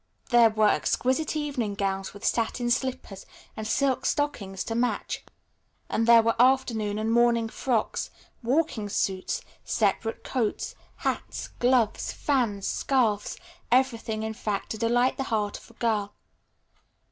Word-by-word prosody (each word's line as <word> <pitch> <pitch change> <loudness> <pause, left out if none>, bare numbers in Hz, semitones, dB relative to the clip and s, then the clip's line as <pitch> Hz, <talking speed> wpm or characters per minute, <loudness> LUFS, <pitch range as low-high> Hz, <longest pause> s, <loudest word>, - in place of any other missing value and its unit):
There 235 -1 +7
were 215 -1 +3
exquisite 265 +9 0
evening 275 -9 -2
gowns, 195 -1 -2
with 205 - -9
satin 240 +1 0
slippers 250 -6 -2 0.3
and 215 0 -5
silk 265 +3 +1
stockings 220 -11 -1
to 225 - -4
match, 240 +2 -1 0.7
and 225 - 0
there 230 -1 +8
were 230 0 +2
afternoon 235 -5 +2
and 220 +1 -1
morning 235 -1 +3
frocks, 235 -2 -1 0.3
walking 245 -4 0
suits, 190 -1 -1 0.2
separate 225 +1 0
coats, 235 -5 -2 0.2
hats, - - -3
gloves, 245 -3 +2
fans, 230 -9 0
scarfs, 225 -6 0 0.3
everything 230 -4 +1
in 220 0 -3
fact 210 -3 -3
to 220 - -4
delight 245 +2 +2
the 270 - -2
heart 210 -3 -1
of - - -18
a - - -17
girl. 215 -4 -1
230 Hz, 135 wpm, -27 LUFS, 210-255 Hz, 0.7 s, there